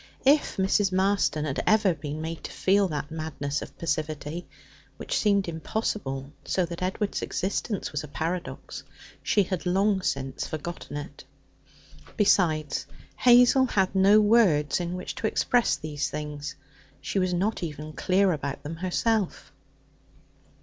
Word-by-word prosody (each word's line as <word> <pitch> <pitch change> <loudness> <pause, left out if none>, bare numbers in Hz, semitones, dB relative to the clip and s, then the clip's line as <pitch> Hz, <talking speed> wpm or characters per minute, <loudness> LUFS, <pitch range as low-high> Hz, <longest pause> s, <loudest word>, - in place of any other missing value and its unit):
If 290 +2 +4
Mrs. 195 +1 +2
Marston 185 -6 +1
had 140 -3 -1
ever 215 -4 +4
been 150 0 -6
made 165 0 -5
to - - -6
feel 195 +1 +2
that 150 -2 -4
madness 155 -3 -3
of - - -10
passivity 155 +1 -3 0.5
which - - -3
seemed 200 -3 +2
impossible, 160 -5 -3
so 185 - 0
that 170 +1 -7
Edward's 190 +3 -1
existence 200 +2 -2
was 150 0 -3
a - - -7
paradox 165 +5 -4 0.4
she 205 - +3
had 185 -1 -3
long 195 +2 +2
since 135 -6 -2
forgotten 155 -1 -6
it. 145 -1 -8 0.9
Besides, 160 -8 +2 0.3
Hazel 250 +2 +6
had 190 -5 +1
no 195 +2 +6
words 205 -10 +4
in 175 0 -3
which 180 - -5
to 220 - 0
express 240 +2 +2
these 150 -2 -3
things; 150 -1 -5 0.4
she 195 - -2
was 185 -1 +1
not 195 +5 0
even 155 -2 -6
clear 190 +3 +2
about 140 -3 -4
them 160 +2 -6
herself. 190 +3 -1
175 Hz, 140 wpm, -27 LUFS, 150-200 Hz, 0.9 s, Hazel